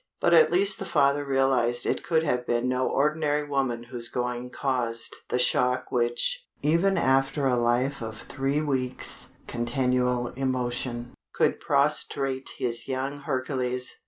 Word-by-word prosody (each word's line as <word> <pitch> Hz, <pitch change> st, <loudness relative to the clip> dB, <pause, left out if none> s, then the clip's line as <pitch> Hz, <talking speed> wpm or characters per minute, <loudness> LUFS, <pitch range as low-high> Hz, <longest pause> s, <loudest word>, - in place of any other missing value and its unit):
But 170 Hz, -, +3 dB
at 165 Hz, -1 st, +6 dB
least 195 Hz, +3 st, +3 dB
the 195 Hz, -, -4 dB
father 140 Hz, -2 st, +2 dB
realised 135 Hz, -3 st, +2 dB
it -, -, -1 dB
could 160 Hz, -2 st, +1 dB
have 125 Hz, -5 st, -1 dB
been 120 Hz, +1 st, +1 dB
no 130 Hz, 0 st, 0 dB
ordinary 150 Hz, 0 st, +1 dB
woman 135 Hz, -4 st, -1 dB
whose 120 Hz, -1 st, -6 dB
going 125 Hz, 0 st, -3 dB
caused 120 Hz, -4 st, -1 dB
the -, -, +1 dB
shock 125 Hz, 0 st, +1 dB
which 125 Hz, -, +1 dB, 0.2 s
even 170 Hz, +6 st, +3 dB
after 135 Hz, +2 st, +2 dB
a 130 Hz, -2 st, +3 dB
life 120 Hz, +3 st, +1 dB
of 110 Hz, -1 st, -6 dB
three 135 Hz, +2 st, -2 dB
weeks' 130 Hz, -3 st, -2 dB, 0.2 s
continual 125 Hz, 0 st, 0 dB
emotion 125 Hz, -2 st, -2 dB, 0.2 s
could -, -, +2 dB
prostrate 135 Hz, -1 st, +1 dB
his 120 Hz, -1 st, -3 dB
young 135 Hz, +2 st, -3 dB
Hercules. 130 Hz, -3 st, -2 dB
130 Hz, 140 wpm, -26 LUFS, 120-140 Hz, 0.2 s, at